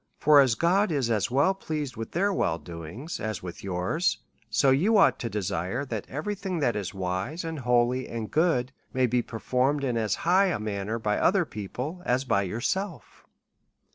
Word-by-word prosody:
For 150 -1 +6
as 130 -5 +5
(iod 190 - +2
is 135 -7 0
as 105 -3 +1
well 140 +9 +3
pleased 150 -8 -4
with 115 0 -6
their 200 +4 +1
wellrdo 85 - -3
ings, 140 - -6
as 110 -3 -4
with 90 -2 -8
yours; 95 - 0 0.3
so 135 +5 +3
you 190 +12 +4
ought 195 - +5
to 120 - -3
desire, 105 +5 -2
that 110 -6 -5
every 155 +10 -3
thing* 190 -2 -4
that 135 -7 +1
is 100 -3 -3
wise, 95 - -3
and 160 -2 -4
holy, 125 0 +2
and 115 -2 -5
good, 150 -6 +2 0.2
may 130 -1 +3
be 125 0 +1
per 115 - -7
foruked 130 +5 +1
in 125 -3 0
as 110 -3 0
high 185 +3 +5
a 180 - 0
manner 105 +1 -3
by 105 -2 0
other 190 -1 +3
people, 125 - -6
as 130 -1 0
by 100 -5 +2
yourself. 140 - -3
125 Hz, 190 wpm, -27 LUFS, 105-160 Hz, 0.3 s, For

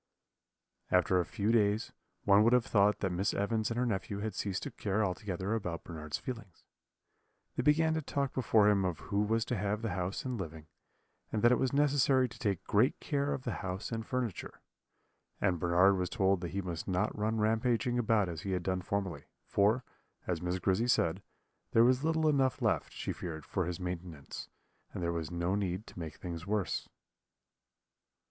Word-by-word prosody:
"After 90 0 +3
a 90 - +1
few 100 +8 -1
days, 110 0 +2 0.3
one 100 +1 +6
would 115 +2 +4
have 125 -2 +4
thought 105 0 +3
that 95 - 0
Miss 95 +3 0
Evans 110 +2 0
and 115 - -3
her 125 - +2
nephew 100 -2 -2
had 105 +1 -3
ceased 95 -2 -2
to 145 - -5
care 105 -1 0
altogether 95 +1 -2
about 90 -7 -3
Bernard's 75 -3 -5
feelings; 115 -8 -8 0.9
they - - 0
began 160 +4 +3
to 160 - 0
talk 140 -2 -2
before 110 -4 +4
him 100 -2 +4
of 90 -3 -1
who 100 0 -1
was 110 +2 +1
to 120 - -1
have 105 +2 -1
the 115 - -1
house 90 +4 -3
and 125 -3 -2
living, 80 -4 -6 0.7
and 110 - -1
that 120 - +7
it 125 - +3
was 130 -2 +1
necessary 140 -2 +3
to - - -13
take 100 -7 -1
great 115 +7 +2
care 140 -1 -1
of 130 - -3
the 120 - -2
house 95 +3 -4
and 115 -1 -4
furniture; 125 -6 -3 0.8
and 90 -4 +1
Bernard 90 +4 +4
was 90 -1 -1
told 95 0 +2
that 85 - -3
he 95 +3 -3
must 85 -3 -5
not 95 +3 0
run 110 +2 0
rampaging 115 +3 +1
about 110 -4 +2
as 80 -3 -5
he 95 - -3
had 90 -1 -1
done 95 0 -1
formerly; 95 -5 -3 0.2
for, 110 +5 +2 0.4
as 85 -3 -2
Miss 90 +1 -1
Grizzy 95 +5 +1
said, 95 -6 +2 0.5
there 115 - +7
was 130 +3 +4
little 160 0 +2
enough 135 -3 +2
left, - - 0
she - - -4
feared, 80 -4 -6
for 95 -3 -1
his 90 +1 -3
maintenance, 90 -5 -6 0.5
and 90 - -3
there 85 0 0
was 80 -2 -3
no 85 +1 -1
need 100 0 -1
to - - -11
make 80 -3 -6
things 85 -1 -6
worse. 105 -2 -1
100 Hz, 195 wpm, -32 LUFS, 90-115 Hz, 0.9 s, that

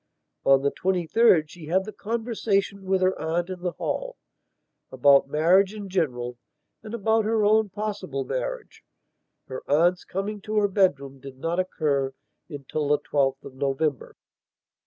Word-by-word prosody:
On 135 0 +4
the 140 - +2
23rd 180 0 +3
she 165 -2 -11
had 190 +4 +1
the 215 - -7
conversation 210 -3 -2
with 190 0 +1
her 185 +1 +2
aunt 170 +3 -1
in 185 - -6
the 180 -1 -2
hallabout 150 - -1
marriage 185 +7 +3
in 205 -2 -7
general 125 -9 -2 0.4
and 220 +1 -6
about 220 0 +2
her 220 -1 +2
own 215 0 +3
possible 215 - -4
marriage, - - -5 0.6
her 130 - -7
aunt's 170 +5 +3
coming 200 +2 -4
to 215 +1 -5
her 205 -1 +4
bedroom 140 -9 +1
did 135 -1 -11
not 165 +6 -2
occur 140 -7 -1 0.3
until 145 0 -4
the 150 +1 +3
12th 140 -2 0
of - - -10
November.... 140 +1 -2
180 Hz, 145 wpm, -25 LUFS, 145-210 Hz, 0.6 s, On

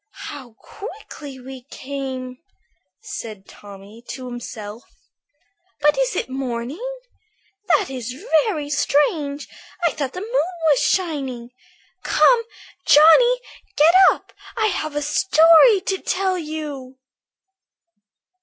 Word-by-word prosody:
"How 260 -5 -10
quickly 310 - -10
we 260 0 -10
came," 260 -2 -6 0.6
said 215 -4 -8
Tommy 205 +3 -13
to 260 -1 -7
himself. 230 -3 -8 1.0
"But 295 0 +3
is - - 0
it - - -2
morning? 260 - -5 0.8
That 385 -9 +2
is 250 -1 -5 0.3
very 310 -9 -3
strange! 290 - 0 0.4
I 340 - +3
thought 275 -3 -4
the 365 - -6
moon 430 -5 -1 0.2
was 280 - +3
shining. 270 -9 -1 0.5
Come, 485 -2 +4 0.4
Johnny, 405 +13 +6 0.4
get 315 +3 +6 0.2
up, - - -5 0.2
I 435 -1 +2
have 310 -4 -4
a 295 - -1
story 330 - +5
to 385 0 -2
tell 375 0 -1
you." 300 -6 -6
290 Hz, 105 wpm, -21 LUFS, 255-350 Hz, 1.0 s, Johnny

